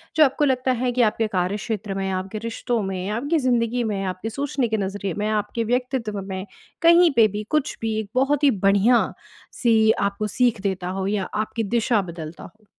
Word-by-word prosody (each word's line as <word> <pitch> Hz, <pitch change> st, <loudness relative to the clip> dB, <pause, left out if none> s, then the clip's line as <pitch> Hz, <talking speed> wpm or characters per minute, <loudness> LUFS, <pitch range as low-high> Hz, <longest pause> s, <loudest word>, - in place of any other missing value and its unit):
जो 315 Hz, -, +7 dB
आपको 285 Hz, +2 st, +1 dB
लगता 260 Hz, -1 st, +1 dB
है 250 Hz, -, +1 dB
कि 245 Hz, +1 st, +1 dB
आपके 225 Hz, 0 st, +2 dB
कार्य 185 Hz, 0 st, -1 dB
क्षेत्र 210 Hz, -1 st, -4 dB
में, 195 Hz, 0 st, -2 dB
आपके 190 Hz, +3 st, -4 dB
रिश्तों 230 Hz, 0 st, -2 dB
में, 190 Hz, 0 st, -3 dB
आपकी 285 Hz, +10 st, 0 dB
ज़िंदगी 245 Hz, -2 st, +1 dB
में, 205 Hz, -3 st, -2 dB
आपकी 185 Hz, +3 st, -4 dB
सोचने 270 Hz, +1 st, -1 dB
के 220 Hz, -1 st, -1 dB
नज़रिए 195 Hz, -1 st, -3 dB
में, 210 Hz, +1 st, -1 dB
आपके 215 Hz, +2 st, -1 dB
व्यक्तित्व 250 Hz, -5 st, -1 dB
में 190 Hz, 0 st, -5 dB, 0.4 s
कहीं 340 Hz, 0 st, +6 dB
पे 225 Hz, -2 st, +6 dB
भी 210 Hz, -, -3 dB
कुछ 305 Hz, -1 st, 0 dB
भी 220 Hz, -1 st, -1 dB
एक 210 Hz, -, -5 dB
बहुत 275 Hz, +3 st, +2 dB
ही 280 Hz, -, +6 dB, 0.2 s
बढ़िया-सी 220 Hz, +1 st, +2 dB
आपको 200 Hz, 0 st, -1 dB
सीख 240 Hz, -4 st, +2 dB
देता 190 Hz, -2 st, -2 dB
हो? 190 Hz, -, -1 dB
या 200 Hz, -1 st, 0 dB
आपकी 220 Hz, +1 st, -2 dB
दिशा 225 Hz, +1 st, +1 dB
बदलता 170 Hz, -3 st, -8 dB
हो? 215 Hz, -1 st, -15 dB
220 Hz, 190 wpm, -23 LUFS, 195-250 Hz, 0.4 s, जो